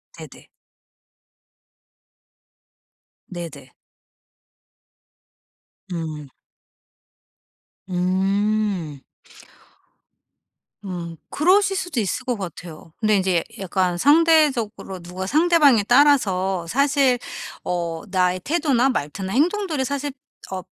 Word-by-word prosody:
네네. - - -13 2.8
네네. 160 -8 -9 2.2
음. 155 -3 -5 1.6
음. 190 -2 0 1.9
음. 170 -3 -6
그러실 390 +5 +3
수도 355 -9 -2
있을 220 +5 -2
것 245 -3 -1
같아요. 170 -4 -9
근데 215 -2 +2
인제 185 -3 +1 0.2
약간 185 -2 -1
상대적으로 285 - +3
누가 180 +2 -7
상대방에 300 - +4
따라서 195 - +3
사실 275 - +2 0.5
어 170 -2 -3
나의 185 -1 +1
태도나 280 -5 +2
말투나 190 - -3
행동들이 325 - +1
사실 280 +1 -3 0.4
어 185 -1 -3
200 Hz, 160 characters per minute, -22 LUFS, 180-280 Hz, 2.8 s, 상대방에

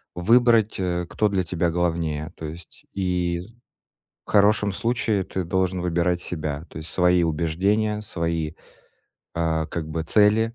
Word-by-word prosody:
выбрать, 115 +2 +4
э, 90 -1 -1
кто 105 -1 +1
для 95 -2 0
тебя 85 0 0
главнее. 80 -2 -1
То 80 - -7
есть 80 +1 -10
и 90 -2 -1 0.8
в - - -16
хорошем 105 0 +4
случае 115 -2 0
ты 95 0 -4
должен 95 0 0
выбирать 90 0 0
себя. 75 -2 -4
То - - -10
есть 80 - -8
свои 90 -1 +3
убеждения, 95 +7 0
свои, 85 -5 -2 0.8
э, 80 -1 0
как 80 -3 -5
бы 80 +1 -3
цели. 110 +5 +3
90 Hz, 140 wpm, -24 LUFS, 80-100 Hz, 0.8 s, выбрать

